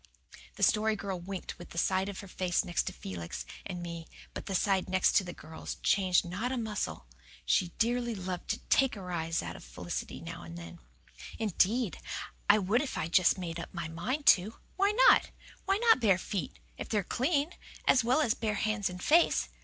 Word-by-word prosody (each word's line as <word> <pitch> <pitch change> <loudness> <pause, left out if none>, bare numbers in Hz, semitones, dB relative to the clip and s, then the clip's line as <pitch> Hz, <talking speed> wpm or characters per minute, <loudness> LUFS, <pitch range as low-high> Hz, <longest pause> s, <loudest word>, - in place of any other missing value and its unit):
The - - -3
Story 215 0 +3
Girl 195 -3 -4
winked 185 +1 -6
with 175 - -10
the - - -11
side 190 +3 +1
of 200 - -6
her 200 - -10
face 185 +1 0
next 175 -2 -1
to - - -1
Felix 85 -3 -6 0.2
and 180 -2 -5
me, 170 -1 -6 0.3
but - - -7
the 195 - -2
side 190 0 +1
next 190 +1 +3
the 175 - -6
girls 160 -1 -8
changed 185 -3 +3
not 200 +8 -3
a 260 - -1
muscle. 210 - -3 0.4
She 180 - +3
dearly 240 0 +1
loved 185 -2 -5
to - - +1
"take 270 -3 +4
a 200 - -8
rise" 165 -2 -2
out - - -6
of - - -11
Felicity - - -5
now - - -7
and 85 +1 -9
then. 85 0 -10 0.6
"Indeed, 220 +1 +1 0.5
I 205 - +8
would 210 +5 +2
if 285 - -4
I 160 - -2
just 185 +1 +4
made 170 -2 -4
up - - -7
my 170 -2 -3
mind 245 - -3
to. 205 +5 -7 0.2
Why 395 +1 +3 0.2
not? - - +6 0.4
Why 390 0 +2
not 460 - +5
bare 205 -6 +4
feet 185 -4 -4 0.2
if - - -5
they're 210 -2 +1
clean 285 - 0 0.3
as 255 - +5
well 255 +6 +3
as 235 -7 +3
bare 215 -3 -2
hands 215 -1 0
and 180 0 -8
face?" 335 +3 +4
195 Hz, 200 wpm, -31 LUFS, 175-225 Hz, 0.6 s, I